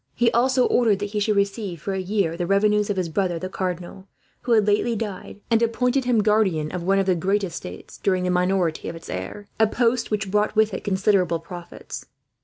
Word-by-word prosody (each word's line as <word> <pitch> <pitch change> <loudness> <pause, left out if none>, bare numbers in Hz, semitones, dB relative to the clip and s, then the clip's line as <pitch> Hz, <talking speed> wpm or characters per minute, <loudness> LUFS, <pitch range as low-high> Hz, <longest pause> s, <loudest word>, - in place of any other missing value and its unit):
He 235 -1 +3
also 255 +2 +3
ordered 225 -5 +3
that 205 0 -4
he 210 - -1
should 210 +1 +1
receive, 200 -3 -1
for 195 +5 -4
a 190 - -2
year, 190 -3 0
the 175 0 -3
revenues 210 +1 +2
of 205 - -1
his 180 -2 0
brother 175 +1 -1
the 185 +3 -5
cardinal, 185 +1 -5 0.3
who 240 - +1
had 215 -2 +4
lately 210 +3 +2
died; 205 -1 -6
and 225 0 +4
appointed 250 +3 +1
him 235 -4 +2
guardian 195 -8 +2
of 180 - -4
one 195 +3 +2
of 195 - +2
the 185 - +3
great 195 +4 0
estates, 165 - -7
during 185 -2 +1
the 180 - 0
minority 180 -2 0
of - - -6
its 165 - -9
heir 95 - -6
a 220 - +5
post 235 +1 +1
which 210 -2 -2
brought 210 +1 +1
with 220 0 +3
it - - -4
considerable 190 -3 +2
profits. 175 +1 -9
200 Hz, 215 wpm, -23 LUFS, 180-215 Hz, 0.3 s, a